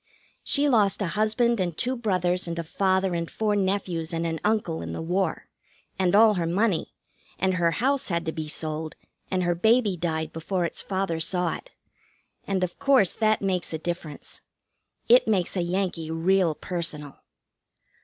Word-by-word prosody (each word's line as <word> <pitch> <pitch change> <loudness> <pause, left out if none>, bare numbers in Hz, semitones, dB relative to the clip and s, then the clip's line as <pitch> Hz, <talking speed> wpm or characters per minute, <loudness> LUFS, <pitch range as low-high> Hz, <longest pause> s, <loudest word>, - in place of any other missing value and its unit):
She 290 0 +2
lost 215 -7 +3
a 180 - -1
husband 220 +2 +2
and 175 -4 -2
two 255 +1 0
brothers 185 -6 0
and 170 0 -4
a 170 - -2
father 190 +2 +1
and 170 -1 -2
four 215 -1 0
nephews 190 -4 -1
and 165 0 -1
an 165 -1 -2
uncle 210 -6 0
in - - -5
the - - -5
war; 185 +4 -1 0.5
and 185 0 +2
all 220 0 +7
her 175 -4 -1
money; 190 0 0 0.4
and 190 0 +1
her 175 -2 +2
house 265 - 0
had 170 -2 -1
to 160 - -1
be 155 -1 -5
sold; 155 +1 -3 0.3
and 185 -1 0
her 175 0 +2
baby 220 +2 +3
died 160 -2 -2
before 175 +2 -2
its - - -3
father 190 -4 -2
saw 180 +2 0
it; - - -11 0.8
and, 190 -2 0
of 180 -1 -4
course, 265 -10 +4
that 215 -2 +1
makes 185 -4 -1
a - - -1
difference. 165 -2 -6 0.7
It 245 0 +6
makes 195 -5 +1
a 180 - +1
Yankee 175 -2 -2
real 170 0 +2
personal. 150 -6 -4
180 Hz, 175 wpm, -26 LUFS, 165-205 Hz, 0.8 s, all